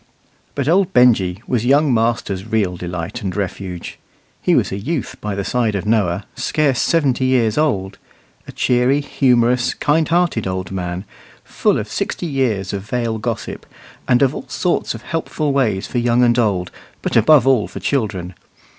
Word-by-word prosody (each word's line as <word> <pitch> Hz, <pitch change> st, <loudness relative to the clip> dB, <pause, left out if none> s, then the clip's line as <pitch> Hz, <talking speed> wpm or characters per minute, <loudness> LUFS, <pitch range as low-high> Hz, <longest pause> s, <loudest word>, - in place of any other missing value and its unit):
But 140 Hz, -1 st, -2 dB
old 180 Hz, +3 st, +2 dB
Benjy 110 Hz, -6 st, +3 dB
was 120 Hz, -3 st, -1 dB
young 140 Hz, +2 st, +3 dB
master's 110 Hz, -4 st, -1 dB
real 105 Hz, -5 st, 0 dB
delight 90 Hz, +6 st, -5 dB
and 95 Hz, -3 st, -4 dB
refuge. 95 Hz, -2 st, -5 dB, 0.4 s
He -, -, +2 dB
was -, -, +1 dB
a -, -, -2 dB
youth 145 Hz, +7 st, -3 dB
by 105 Hz, -1 st, -3 dB
the 100 Hz, -, -2 dB
side 115 Hz, -1 st, 0 dB
of 100 Hz, 0 st, -3 dB
Noah, 100 Hz, -4 st, +1 dB
scarce 140 Hz, -5 st, +1 dB
seventy 135 Hz, -6 st, +1 dB
years 120 Hz, -4 st, +2 dB
old 100 Hz, -11 st, -1 dB, 0.5 s
a -, -, -7 dB
cheery, 125 Hz, +3 st, +2 dB
humorous, 125 Hz, -3 st, +2 dB
kind 155 Hz, +2 st, +1 dB
hearted 170 Hz, -, +1 dB
old 95 Hz, -1 st, -4 dB
man, 90 Hz, 0 st, -4 dB, 0.4 s
full -, -, 0 dB
of -, -, -3 dB
sixty -, -, -3 dB
years 120 Hz, -, -1 dB
of 100 Hz, -, -3 dB
Vale 115 Hz, +1 st, -2 dB
gossip, -, -, -4 dB, 0.4 s
and 125 Hz, +2 st, +4 dB
of 135 Hz, 0 st, +2 dB
all -, -, -7 dB
sorts 125 Hz, +9 st, -1 dB
of -, -, -10 dB
helpful 155 Hz, -3 st, -2 dB
ways 110 Hz, -8 st, +1 dB
for 125 Hz, -, -2 dB
young 120 Hz, +1 st, +2 dB
and 120 Hz, 0 st, +3 dB
old, 95 Hz, -6 st, 0 dB, 0.3 s
but -, -, -2 dB
above 150 Hz, -5 st, +6 dB
all 130 Hz, -6 st, +3 dB
for -, -, -8 dB
children. 100 Hz, -9 st, -2 dB
120 Hz, 170 wpm, -19 LUFS, 100-135 Hz, 0.5 s, above